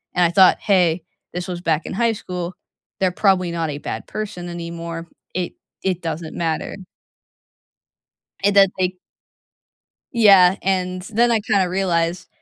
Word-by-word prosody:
And 180 - +4
I - - +3
thought, 185 0 +6
"Hey, 180 -4 +2 0.3
this 175 0 -4
was 175 -1 -5
back 160 -2 0
in - - -5
high 230 +3 +2
school, 180 -3 -5 0.5
they're 190 -2 +2
probably 185 -2 +2
not 165 -2 -2
a 145 - -4
bad - - -6
person 190 -5 -5
anymore. 170 -1 -6 0.3
It 180 -1 -2 0.3
it 185 -2 -1
doesn't 160 -1 -5
matter." 165 -2 -2 1.7
And 200 0 +3
that 195 -1 +8
they 185 0 0 1.2
Yeah, 195 -5 +7
and 185 -1 0
then 230 +4 +1
I 225 -2 +3
kinda 200 -3 +1
realized, 175 -1 0
180 Hz, 145 wpm, -21 LUFS, 170-195 Hz, 1.7 s, that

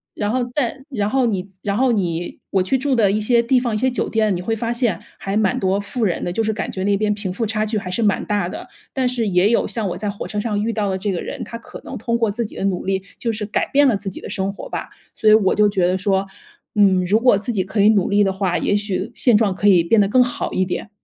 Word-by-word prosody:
然 205 -1 -1
后 255 +1 0
在 265 -1 -1
然 210 -7 -1
后 260 +1 +2
你 195 -5 -1 0.2
然 200 0 -1
后 260 +1 +3
你 175 -5 -2
我 190 -2 +2
去 190 - +1
住 265 +1 0
的 205 -5 +3
一 215 - 0
些 235 +3 +3
地 250 +2 +3
方、 240 -3 -2
一 - - +1
些 260 +4 +1
酒 250 - -2
店， 215 -4 +1
你 175 - -4
会 225 +5 -1
发 230 +2 -2
现 235 -8 0 0.2
还 195 +2 -2
蛮 210 -3 +1
多 190 +1 +1
富 205 +4 -3
人 180 - -1
的， 175 - -2
就 225 - 0
是 220 - 0
感 205 - -4
觉 190 - -4
那 200 -1 +2
边 210 0 +1
贫 205 -2 -3
富 210 +5 -2
差 215 0 -1
距 215 0 -1
还 185 -3 -4
是 210 - -1
蛮 205 -3 +1
大 205 -4 -1
的。 - - -8 0.3
但 260 -2 0
是 245 -3 -1
也 185 +2 +3
有 235 - +2
像 220 -4 -2
我 175 - -4
在 210 +1 -3
火 200 - -6
车 210 - -3
上 205 -1 -1
遇 230 +1 -1
到 210 -2 -1
的 190 - -1
这 195 +1 -2
个 175 - -3
人， - - -6
他 - - -8
可 - - -11
能 - - -7
通 235 +1 0
过 225 -3 +1
自 235 +4 -2
己 - - -9
的 - - -4
努 190 -2 -1
力 190 0 -1 0.2
就 230 - -1
是 210 -1 -3
改 205 - -1
变 285 0 +5
了 240 - +3
自 195 - -5
己 190 - -7
的 - - -7
生 195 +1 -1
活 - - -9
吧。 - - -5 0.3
所 215 - +3
以 - - +8
我 210 -3 +4
就 210 0 +4
觉 190 -3 +1
得 180 - +2
说： 195 0 +1 0.5
“嗯， 190 -3 +4
如 205 +5 +3
果 245 -4 +4
自 215 +4 -3
己 195 -4 +1
可 195 +3 -4
以 210 - +6
努 205 -4 +3
力 205 0 +4
的 195 - +1
话， 190 -2 0
也 205 - +1
许 205 +2 -2
现 240 -5 +4
状 210 -4 +2
可 200 +2 0
以 180 -4 +6
变 210 +6 +4
得 200 - +3
更 250 +5 +4
好 245 - -3
一 185 - +1
点。” 180 - -4
210 Hz, 320 characters per minute, -20 LUFS, 195-230 Hz, 0.5 s, 以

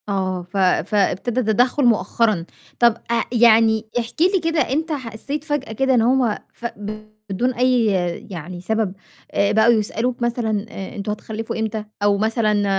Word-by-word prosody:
آه، 185 -2 -1
ف 200 - -4
فابتدا 200 +5 +1
تدخُّل 245 +5 +2
مؤخرًا، 215 -4 +2 0.3
طَب 235 -2 +4
آآ 235 -1 +2
يعني 225 -2 +4
احكِ 235 +6 -5
لي 375 +2 +4
كده 330 -1 +1
أنت 310 +5 -1
حسّيت 275 +2 -4
فجأة 290 -6 -3
كده 265 +4 +1
إن 240 - +4
هُم 240 -2 +2 0.2
ف 240 - -11 0.6
بدون 245 +7 0
أي 250 -1 +2 0.5
يعني 175 0 -7
سبب 220 0 -1 0.4
آآ 200 0 +2
بقوا 220 +2 +5
يسألوك 230 +3 -1
مثلًا 225 -3 -1
آآ 195 -2 -8
أنتم 205 +1 -3
هتخلّفوا 220 +1 -5
إمتى، 220 -1 -3 0.2
أو 205 -1 +3
مثلًا 215 -1 +1
225 Hz, 150 wpm, -21 LUFS, 205-245 Hz, 0.6 s, بقوا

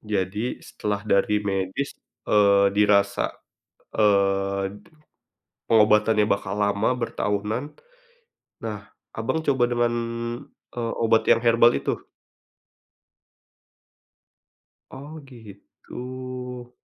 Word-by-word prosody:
Jadi, 105 +2 -2
setelah 105 0 -4
dari 105 0 +2
medis, 95 +7 -2 0.3
eee, 100 -1 +4
dirasa, 100 -1 +3 0.6
eee, 100 -1 +1 0.9
pengobatannya 105 -1 +4
bakal 100 -1 -1
lama, 100 +1 +1
bertahunan. 110 0 -2 1.0
Nah, - - -4 0.4
Abang, 160 - -1
coba 130 -3 +3
dengan, 120 0 +1 0.8
eee, 115 -1 -2
obat 115 -1 +3
yang - - +6
herbal 115 0 +5
itu? - - -3 2.9
Oh, 145 +4 -9
gitu. 125 +2 -9
105 Hz, 80 wpm, -24 LUFS, 100-120 Hz, 2.9 s, yang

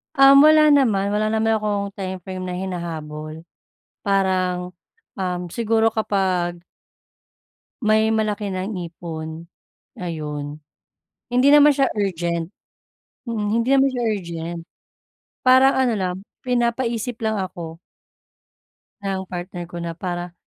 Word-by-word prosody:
Um, 275 0 +8
wala 310 -1 +7
naman, 215 -9 +3
wala 210 +1 +1
naman 220 0 +1
akong 205 -1 -2
timeframe 185 -1 -5
na 180 - -3
hinahabol 160 -4 -5 0.6
parang, 185 -2 0 0.4
um, 180 -2 -3
siguro 225 0 +2
kapag 185 -5 0 1.2
may 220 0 +3
malaki 215 -2 0
ng 190 +3 -3 0.2
ipon, 160 -1 -7 0.6
ayun. 150 -4 -5 0.7
Hindi 250 +2 +3
naman 295 -1 +7
siya 275 -2 +2
urgent. 170 -5 -1 0.8
Mm, 225 -4 -2
hindi 230 +1 0
naman 275 0 +5
siya 250 -2 -2
urgent, 170 -3 -5 0.8
parang 260 +1 +6
ano 255 -3 +2
lang 185 -2 -1 0.3
pinapaisip 240 -1 0
lang 220 - +1
ako 170 -3 -7 1.2
ng 190 -1 -3
partner 175 0 -5
ko 175 - -7
na 170 -1 -4
para 175 0 -5
195 Hz, 110 wpm, -22 LUFS, 175-225 Hz, 1.2 s, Um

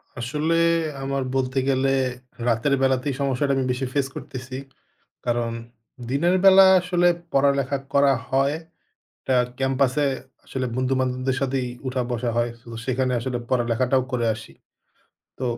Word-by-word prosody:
আসলে 150 +7 -1 0.5
আমার 135 0 -1
বলতে 130 0 -1
গেলে 135 0 +2 0.6
রাতের 120 +4 +2
বেলাতেই 130 +1 +1
সমস্যাটা 140 +1 +1
আমি 130 - 0
বেশি 125 +1 -2
ফেস 140 -2 +1
করতেছি। 130 0 -7 0.7
কারণ 120 -1 0 0.6
দিনের 170 +7 +2
বেলা 195 0 +8
আসলে 175 0 +2 0.3
পড়ালেখা 140 0 +2 0.2
করা 140 -1 +5 0.2
হয়। 135 +2 +2 0.7
টা 130 - +3 0.2
ক্যাম্পাসে 135 +1 +1 0.4
আসলে 130 -1 -3
বন্ধু-বান্ধবদের 130 0 0
সাথেই 130 -2 0 0.2
উঠা 130 0 -1
বসা 120 0 -1
হয়। 120 0 +1
সো 120 - -23 0.2
সেখানে 130 0 0
আসলে 125 0 -3
পড়ালেখাটাও 125 +1 +1
করে 120 -2 0
আসি। 110 0 -12 0.9
তো - - -3
130 Hz, 125 wpm, -23 LUFS, 125-140 Hz, 0.9 s, বেলা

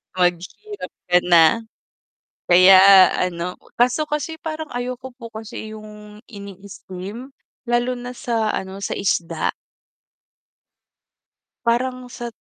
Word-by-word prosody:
Maghirap 180 - -3 0.2
ka 180 - +5
na. 170 -2 +6 1.0
Kaya 185 +1 +8
ano, 180 0 -3 0.3
kaso 250 +5 +3
kasi 300 +2 -3
parang 315 -1 -6
ayoko 250 +1 -5
po 230 -3 -10
kasi 220 0 -8
yung 210 -1 -12
ini-steam, 200 +2 -10 0.3
lalo 240 +1 0
na 245 0 -7
sa 230 -3 -2
ano, 190 0 -5
sa - - -3
isda. 175 -3 -1 2.2
Parang 250 +1 -1
sa 240 0 -6
220 Hz, 100 wpm, -21 LUFS, 190-250 Hz, 2.2 s, Kaya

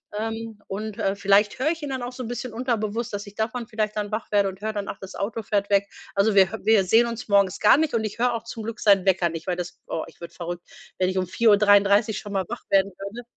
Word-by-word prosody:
ähm, 225 0 -4
und, 210 +2 -5
äh, 195 +1 0
vielleicht 200 +1 +3
höre 300 +5 +1
ich 330 -1 -5
ihn 290 - -4
dann 260 -2 -3
auch 245 - -4
so 255 - -7
'n - - -5
bisschen 245 -1 -5
unterbewusst, 230 -2 -2
dass 205 0 -4
ich 200 - -12
davon 225 +3 -3
vielleicht 215 -2 -2
dann 210 -1 -3
wach 215 0 -4
werde 200 -1 +3
und 190 +1 -11
höre 220 0 -2
dann: 205 -1 -4
„Ach, - - -6
das 190 - -9
Auto 220 +3 -3
fährt 200 -1 -1
weg.“ 200 0 +3 0.3
Also 200 +1 +2
wir 190 0 +6
hö 220 -2 +3
sehen 225 +6 +4
uns 230 -1 -6
morgens 200 -2 +3
gar 215 - +6
nicht 310 -5 0
und 220 - +1
ich 215 +1 -5
höre 245 0 +2
auch 225 - -5
zum 230 -1 -7
Glück 230 +1 -6
seinen 200 -3 +4
Wecker 180 -2 +3
nicht, 165 +1 -7
weil 180 - 0
das 180 0 -6
oh, 160 - -3
ich - - -17
würde 170 0 -9
verrückt, 175 0 -6 0.3
wenn 185 0 +2
ich 190 - -3
um 185 - +1
4:33 205 +1 +4
schon 205 -1 -8
mal 190 -2 0
wach 240 - -6
werden 195 0 +3
würde. 205 +5 -7
210 Hz, 270 wpm, -24 LUFS, 195-225 Hz, 0.3 s, wir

